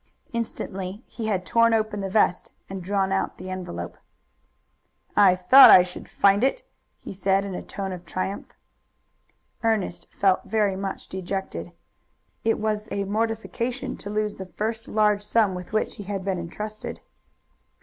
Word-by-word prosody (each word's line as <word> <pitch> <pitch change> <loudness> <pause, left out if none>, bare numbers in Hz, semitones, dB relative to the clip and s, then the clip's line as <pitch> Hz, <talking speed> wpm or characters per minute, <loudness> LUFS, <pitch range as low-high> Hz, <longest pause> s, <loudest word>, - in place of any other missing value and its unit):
Instantly 200 -3 -4
he 225 -3 -6
had 190 -4 -1
torn 230 +1 +4
open 215 -2 -1
the 195 - -3
vest 190 -2 +2 0.2
and 195 -1 -6
drawn 195 +1 0
out 195 - -1
the 185 +1 -7
envelope. 130 - -6 1.2
"I 190 -3 +6
thought 220 +10 +9
I 180 - +9
should 180 0 -9
find 200 +3 +3
it," 275 - +1 0.3
he - - -9
said 195 +1 +1
in 195 - -5
a - - -4
tone 195 -1 -5
of 180 -1 -7
triumph. 190 +2 -4 1.2
Ernest 205 -6 0
felt 195 -2 +2
very 210 -2 +1
much 195 0 -4
dejected. 190 +1 -5 0.7
It 225 - +2
was 215 0 -2
a 200 - -1
mortification 230 +5 -2
to 205 - -8
lose 210 0 -1
the 190 - -7
first 220 +5 -4
large 210 -1 +2
sum 210 -1 +2
with 180 -1 -7
which 215 0 -1
he 205 - -6
had 195 -1 -4
been 190 -2 -1
intrusted. 210 +6 -6
200 Hz, 155 wpm, -25 LUFS, 185-215 Hz, 1.2 s, thought